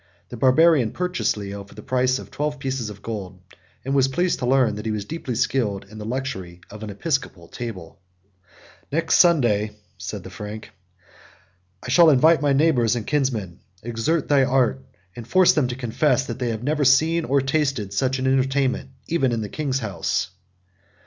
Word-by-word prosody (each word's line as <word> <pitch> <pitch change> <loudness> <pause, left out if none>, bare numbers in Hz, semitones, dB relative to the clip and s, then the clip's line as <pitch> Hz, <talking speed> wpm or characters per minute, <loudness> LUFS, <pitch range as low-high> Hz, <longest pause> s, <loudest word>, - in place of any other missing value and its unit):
The - - -7
Barbarian 130 -1 +4
purchased 180 -8 -1
Leo 100 0 -6
for 100 - -17
the 105 - -10
price 130 0 +1
of - - -10
twelve 150 0 -2
pieces 135 -4 -3
of 105 -1 -11
gold; 95 -5 -6 0.5
and 135 - -1
was 135 -1 +4
pleased 175 +7 0
to 125 - -2
learn 130 -4 +3
that 105 +1 -7
he - - 0
was 105 -2 -3
deeply 135 -3 -5
skilled 115 -5 0
in 110 +2 -12
the 105 - -6
luxury 110 -8 -4
of 105 +1 -10
an 110 - -6
episcopal 100 - -3
table: 95 -9 -8 0.9
"Next 165 +3 +2
Sunday," 115 - +3 0.2
said - - -6
the - - -10
Frank, 105 +1 -8 1.1
"I - - -7
shall 165 +5 +6
invite 155 +3 +5
my 145 -1 +2
neighbors 135 -6 +3
and 115 - -4
kinsmen. 120 - -1 0.2
Exert 120 +8 -1
thy 140 -2 +4
art, 125 - +1 0.3
and 120 -1 -9
force 185 +3 +5
them 145 -5 +1
to 125 - -4
confess, 130 +2 +1
that 115 -1 -6
they 125 -2 -1
have 110 0 -4
never 150 +2 0
seen, 160 +6 +4
or 140 -2 +2
tasted, 135 -7 -1
such 130 +5 0
an 130 - -3
entertainment, 135 0 +1 0.2
even 145 -7 +1
in 115 -1 -1
the 105 - -5
king's 135 -1 -2
house." 95 -3 -2
130 Hz, 180 wpm, -23 LUFS, 110-140 Hz, 1.1 s, shall